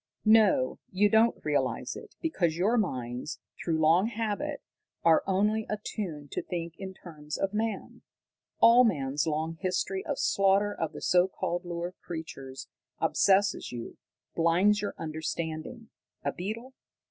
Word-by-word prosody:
"No, 215 -12 +4
you 205 +3 +3
don't 225 +1 +4
realize 140 -4 0
it, - - -11
because 175 - 0
your 205 +7 +2
minds, 125 - -2 0.2
through 165 -2 0
long 165 +6 +4
habit, 230 +6 -3 0.4
are 165 -1 +5
only 210 +3 +1
attuned 185 -8 -5
to - - -2
think 170 -2 -5
in 190 -1 -6
terms 150 -5 -7
of 195 +1 -1
man. 220 +1 -3 0.6
All 235 +2 +8
man's 145 - 0
long 160 +1 -1
history 190 0 -1
of 285 - -3
slaughter 200 -5 +3
of 160 -4 -3
the - - -8
so 180 0 +4
called 175 -1 -3
lower 175 0 -4
creatures 140 -5 -7 0.3
obsesses 195 +1 +2
you, 120 -1 -7 0.4
blinds 180 +5 +3
your 205 - -3
understanding. 160 +7 -5 0.3
A - - +1
beetle? 225 +8 -6
185 Hz, 135 wpm, -29 LUFS, 160-210 Hz, 0.6 s, All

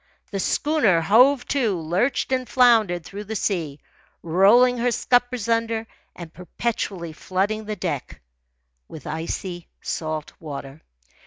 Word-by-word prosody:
The 200 - -3
schooner, 255 - +2
hove 245 - +4
to, 230 -10 +1
lurched 180 - 0
and 255 -1 -1
floundered 225 -9 +4
through 200 +3 -8
the 220 +2 -5
sea, 165 -8 -2 0.4
rolling 220 +9 +4
her 245 +1 +2
scuppers 245 -1 +1
under 230 -1 0 0.3
and 170 -2 -10
perpetually 180 -2 -4
flooding 200 +6 -2
the 215 0 -4
deck 165 -9 -4 0.7
with 155 - -11
icy 170 +3 -5 0.2
salt 155 -2 -4
water. 140 -1 -8
200 Hz, 120 wpm, -23 LUFS, 170-235 Hz, 0.7 s, hove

